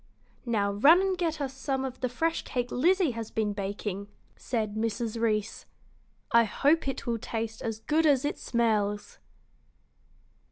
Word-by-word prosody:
"Now 205 -4 +1
run 285 - +6
and 385 0 +1
get 330 -3 -1
us 270 -2 -3
some 265 0 -2
of 260 -1 -6
the 255 - -1
fresh 325 +7 0
cake 245 -2 -3
Lizzie 345 +4 +3
has 230 -2 -6
been 215 -2 -1
baking," 200 0 -4 0.3
said 220 -4 -2
Mrs. 225 +1 -2
Reece. 215 -1 -1 0.6
"I 235 0 +6
hope 280 +9 +2
it 270 -1 -3
will 235 -1 -1
taste 225 0 -4
as 225 -1 -4
good 310 +5 +2
as 280 -2 +3
it 290 - -2
smells." 210 -3 0
235 Hz, 155 wpm, -28 LUFS, 215-280 Hz, 0.6 s, run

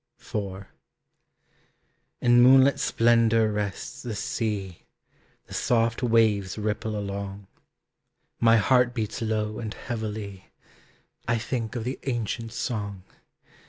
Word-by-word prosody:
IV. 100 -2 -5 1.6
In 120 0 +5
moonlit 135 +2 +6
splendor 115 -1 +3
rests 105 -2 -4
the 120 -3 -5
sea, 100 -4 -3 0.6
The - - -12
soft 115 0 +1
waves 110 -5 +2
ripple 110 0 -2
along. 100 0 -5 0.9
My 115 0 +5
heart 125 +3 +3
beats 110 -1 -3
low 110 -1 -1
and 110 -2 -5
heavily, 105 -5 -5 0.8
I 115 0 +2
think 115 0 -3
of 120 - -2
the 130 +3 -4
ancient 115 -2 -2
song. 105 -5 -4
110 Hz, 105 wpm, -26 LUFS, 105-120 Hz, 1.6 s, moonlit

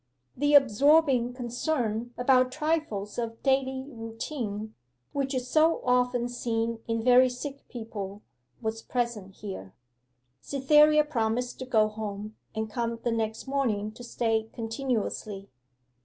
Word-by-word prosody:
The 290 +2 +3
absorbing 270 -1 +5
concern 240 -2 -2
about 255 0 +4
trifles 300 -10 -1
of 230 -1 -4
daily 265 -1 +1
routine, 225 -3 -5 0.4
which 275 -1 -1
is 255 -1 -2
so 315 +5 +4
often 250 -1 +2
seen 230 -1 -2
in 230 -1 -1
very 255 +1 +6
sick 275 +3 -7
people, 210 -4 -6 0.4
was 220 0 -2
present 230 -7 -3
here. 190 - -8 0.6
Cytherea 300 - +5
promised 245 -4 -1
to 260 - -6
go 220 -4 +4
home, 210 0 -6 0.2
and 220 0 -1
come 230 +1 -2
the 240 - +1
next 220 -1 -2
morning 235 -7 0
to 235 +3 -12
stay 225 -2 0
continuously. 225 - -3
240 Hz, 125 wpm, -28 LUFS, 220-265 Hz, 0.6 s, very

